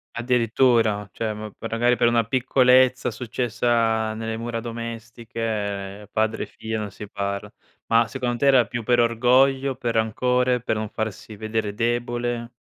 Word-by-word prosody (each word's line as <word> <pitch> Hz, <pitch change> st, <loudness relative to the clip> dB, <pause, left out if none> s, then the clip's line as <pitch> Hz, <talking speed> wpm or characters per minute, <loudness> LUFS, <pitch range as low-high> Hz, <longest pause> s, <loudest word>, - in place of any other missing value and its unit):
Addirittura, 115 Hz, -3 st, +2 dB
cioè 110 Hz, -1 st, -2 dB
ma 105 Hz, 0 st, -7 dB
per 115 Hz, -, -7 dB
magari 120 Hz, +2 st, +2 dB
per 120 Hz, -, +3 dB
una 115 Hz, -1 st, +2 dB
piccolezza 130 Hz, +1 st, +3 dB
successa 115 Hz, -2 st, 0 dB
nelle 110 Hz, 0 st, -4 dB
mura 115 Hz, 0 st, -4 dB
domestiche, 115 Hz, -3 st, -5 dB
padre 110 Hz, +1 st, 0 dB
e -, -, -11 dB
figlia 110 Hz, 0 st, -5 dB
non 105 Hz, -, -4 dB
si 105 Hz, +1 st, -9 dB
parla. 100 Hz, 0 st, -4 dB, 0.3 s
Ma 115 Hz, 0 st, +3 dB
secondo 120 Hz, +1 st, -3 dB
te 140 Hz, -, +1 dB
era 130 Hz, -4 st, +5 dB
più 120 Hz, 0 st, -4 dB
per 120 Hz, +2 st, +2 dB
orgoglio, 130 Hz, +3 st, +3 dB
per 120 Hz, -3 st, -2 dB
rancore, 125 Hz, +3 st, +1 dB
per 110 Hz, -, -1 dB
non 110 Hz, 0 st, -3 dB
farsi 110 Hz, 0 st, -5 dB
vedere 110 Hz, 0 st, -2 dB
debole? 120 Hz, +1 st, -2 dB
115 Hz, 150 wpm, -23 LUFS, 110-120 Hz, 0.3 s, era